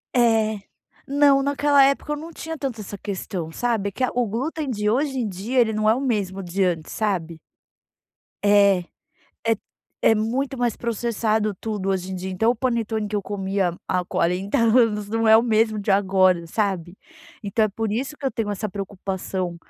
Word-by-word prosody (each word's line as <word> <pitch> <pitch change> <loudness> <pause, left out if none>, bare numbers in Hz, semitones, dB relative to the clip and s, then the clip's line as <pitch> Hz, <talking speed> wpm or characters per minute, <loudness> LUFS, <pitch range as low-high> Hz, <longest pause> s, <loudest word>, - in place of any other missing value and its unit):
É. 220 -3 +3 0.5
Não, 280 0 +4
naquela 285 0 +4
época 275 +2 0
eu - - -3
não 325 +3 -8
tinha 320 0 -6
tanto 260 -7 -4
essa 205 0 -7
questão, 185 -4 -5
sabe. 220 0 -1
Que 255 - -4
a 255 - +2
o 245 -1 +1
glúten 280 +7 -3
de 210 -3 0
hoje 270 +4 0
em 235 - -1
dia, 210 +7 -2
ele 230 -2 +4
não 215 0 +2
é 220 - +5
o 260 - -3
mesmo 200 -7 -1
de 185 +3 -1
antes, 170 -4 -1
sabe? 175 -7 -2 1.0
É 200 -3 +5 0.6
é 225 -1 +3 0.5
é - - +5
muito 255 +6 -1
mais 240 -2 0
processado 220 -2 -1
tudo 210 -3 -3
hoje 190 -1 -1
em - - -3
dia 185 +1 -5
então 220 +5 +2
o - - +2
panetone 225 -3 -1
que 210 - -2
eu 205 - -1
comia 195 -3 -1
há 180 -1 0
40 180 +3 0
anos 225 -3 +3
não 225 +1 0
é 220 0 +8
o 225 - +4
mesmo 220 -2 +2
de 205 0 -2
agora, 190 -3 +3
sabe. 185 -2 -2 0.5
Então 210 +2 +1
é 215 - +1
por 220 +1 -3
isso 260 +7 -3
que 285 - -12
eu - - +1
tenho 225 -4 -2
essa 205 +1 -3
preocupação, 190 -2 -4
215 Hz, 190 wpm, -23 LUFS, 195-240 Hz, 1.0 s, é